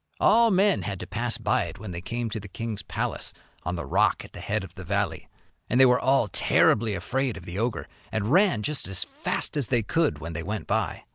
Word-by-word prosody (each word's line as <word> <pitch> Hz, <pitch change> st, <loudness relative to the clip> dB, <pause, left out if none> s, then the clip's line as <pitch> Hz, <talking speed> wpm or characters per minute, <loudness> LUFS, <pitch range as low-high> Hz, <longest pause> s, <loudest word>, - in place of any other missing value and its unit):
All 230 Hz, 0 st, +5 dB
men 195 Hz, -, +3 dB
had 95 Hz, 0 st, -4 dB
to -, -, -5 dB
pass 120 Hz, +4 st, -2 dB
by 110 Hz, -4 st, +1 dB
it 85 Hz, -, -8 dB
when 95 Hz, -1 st, -7 dB
they 85 Hz, 0 st, -5 dB
came 115 Hz, +4 st, -3 dB
to 110 Hz, -, -3 dB
the 100 Hz, -, -9 dB
king's 110 Hz, +1 st, -4 dB
palace -, -, -3 dB, 0.3 s
on 90 Hz, +1 st, -3 dB
the 85 Hz, -, -4 dB
rock -, -, +2 dB
at -, -, -15 dB
the -, -, -9 dB
head -, -, -2 dB
of -, -, -10 dB
the -, -, -9 dB
valley. -, -, -2 dB, 0.4 s
And 125 Hz, -, +2 dB
they 130 Hz, -, +10 dB
were 125 Hz, -1 st, +5 dB
all 130 Hz, -3 st, +3 dB
terribly 105 Hz, +2 st, +3 dB
afraid 125 Hz, +7 st, -1 dB
of 90 Hz, -, -10 dB
the 90 Hz, +2 st, -5 dB
ogre, 115 Hz, 0 st, -2 dB, 0.2 s
and 110 Hz, 0 st, -1 dB
ran 180 Hz, -, +4 dB
just 150 Hz, +3 st, +1 dB
as 95 Hz, -2 st, 0 dB
fast -, -, -3 dB
as 140 Hz, -6 st, 0 dB
they 120 Hz, -3 st, +2 dB
could 160 Hz, +9 st, +1 dB
when 85 Hz, +1 st, -7 dB
they 80 Hz, -, -4 dB
went 105 Hz, +4 st, -4 dB
by.' -, -, -1 dB
110 Hz, 235 wpm, -26 LUFS, 95-130 Hz, 0.4 s, they